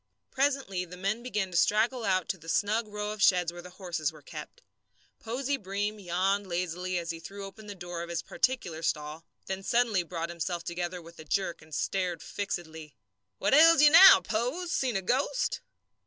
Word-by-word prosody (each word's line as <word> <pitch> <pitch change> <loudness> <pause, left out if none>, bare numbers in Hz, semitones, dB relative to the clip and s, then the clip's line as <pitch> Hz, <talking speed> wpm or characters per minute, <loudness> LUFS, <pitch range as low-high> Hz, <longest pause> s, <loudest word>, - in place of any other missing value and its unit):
Presently 270 -9 0
the 180 0 -10
men 200 +5 -1
began 210 -6 -2
to 170 - -1
straggle 225 +6 +2
out 185 -4 +1
to 190 - -1
the 165 +1 -11
snug 215 +5 +1
row 210 0 -4
of 215 -1 -7
sheds 180 -4 +4
where 175 - -8
the 180 - -11
horses 175 -5 -3
were 155 -2 -16
kept. - - -10 0.6
Posey 260 +5 -2
Breem 205 +2 -3
yawned 190 +3 0
lazily 180 +1 -2
as 170 -1 -3
he 165 - -7
threw 195 +4 -8
open 210 +2 -11
the 205 - -7
door 175 -2 -6
of 170 - -6
his 170 -1 -3
particular 185 -12 -1
stall, 155 0 -3 0.2
then 190 0 -4
suddenly 230 -2 +2
brought 170 -1 -5
himself 170 0 -3
together 175 +1 -4
with 170 +1 -14
a - - -8
jerk 170 +2 -2
and 155 -1 -9
stared 180 -1 -2
fixedly. 160 -6 -5 0.4
"What - - 0
ails 325 +1 +7
you 295 - +8
now, 375 +4 +10
Pose? 250 +11 -2
Seen 255 -7 0
a 195 - -1
ghost?" 265 - 0
190 Hz, 190 wpm, -29 LUFS, 170-220 Hz, 0.6 s, now